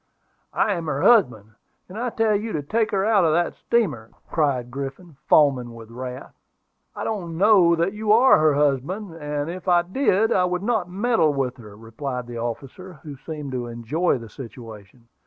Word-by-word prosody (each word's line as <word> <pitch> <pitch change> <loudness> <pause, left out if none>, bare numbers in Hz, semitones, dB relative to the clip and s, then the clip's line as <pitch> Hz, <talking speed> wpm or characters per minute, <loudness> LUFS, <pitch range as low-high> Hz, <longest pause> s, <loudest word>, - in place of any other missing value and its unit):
"I 210 - +2
am 170 -3 -4
her 145 -2 -2
husband; 120 - +3 0.4
and 185 - -12
I 245 +3 -2
tell 225 -2 +1
you 215 +2 -3
to 150 - -2
take 220 +8 0
her 195 -2 0
out 215 -4 +3
of 160 -2 +3
that 175 +1 +1
steamer," 150 - -1 0.2
cried 135 -6 0
Griffin, 140 +4 -7
foaming 130 -6 +3
with 115 -1 -12
wrath. 125 +2 -8 0.6
"I - - -5
don't 175 -7 -4
know 190 -3 +5
that 170 +4 0
you 210 0 -1
are 240 0 +6
her 155 -2 +3
husband; 150 +7 -1
and 150 -2 -4
if 180 +2 -7
I 175 -1 +4
did, 220 +2 +1
I 180 - +3
would 180 +1 -2
not 215 -5 0
meddle 195 -6 +1
with 130 -2 -2
her," 105 -4 -13
replied 125 +3 -6
the 120 -1 -7
officer, 135 +10 -6
who 145 -2 -8
seemed 150 0 -7
to 125 -2 -4
enjoy 120 +9 -1
the 115 -2 -10
situation. 115 -2 -12
155 Hz, 185 wpm, -23 LUFS, 125-195 Hz, 0.6 s, are